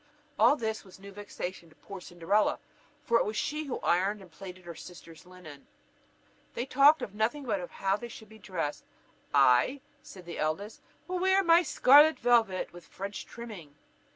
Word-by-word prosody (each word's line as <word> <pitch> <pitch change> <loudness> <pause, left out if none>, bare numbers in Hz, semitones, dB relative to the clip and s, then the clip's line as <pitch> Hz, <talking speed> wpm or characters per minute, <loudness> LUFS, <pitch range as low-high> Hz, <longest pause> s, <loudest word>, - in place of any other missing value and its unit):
All 240 +6 +6
this 220 -5 -4
was 190 -3 -15
new 200 +1 -11
vexation 190 -4 -7
to 155 - -22
poor 195 -2 -10
Cinderella, 175 +5 0 0.5
for 235 0 +3
it - - +2
was 215 +1 -4
she 305 +1 -2
who 270 - -4
ironed 195 +4 +1
and 190 -3 -15
plaited 185 0 -11
her 170 - -7
sisters' 170 -1 -13
linen. 175 -6 -13 0.9
They 240 - -2
talked 280 +2 +5
of 205 - -6
nothing 230 +7 -1
but 195 -7 -2
how 195 +1 -1
they 240 - -8
should 220 -1 -12
be 220 0 -15
dressed: 180 -8 -4 0.5
"I," 135 - +4 0.2
said 185 -2 -13
the 170 - -7
eldest, 190 +8 -3 0.3
"will 365 0 -2
wear 380 +1 +3
my 335 0 +6
scarlet 295 -1 +6
velvet 230 -8 +1
with 175 -1 -13
French 195 +1 -7
trimming." 205 -12 -10
205 Hz, 175 wpm, -29 LUFS, 180-245 Hz, 0.9 s, All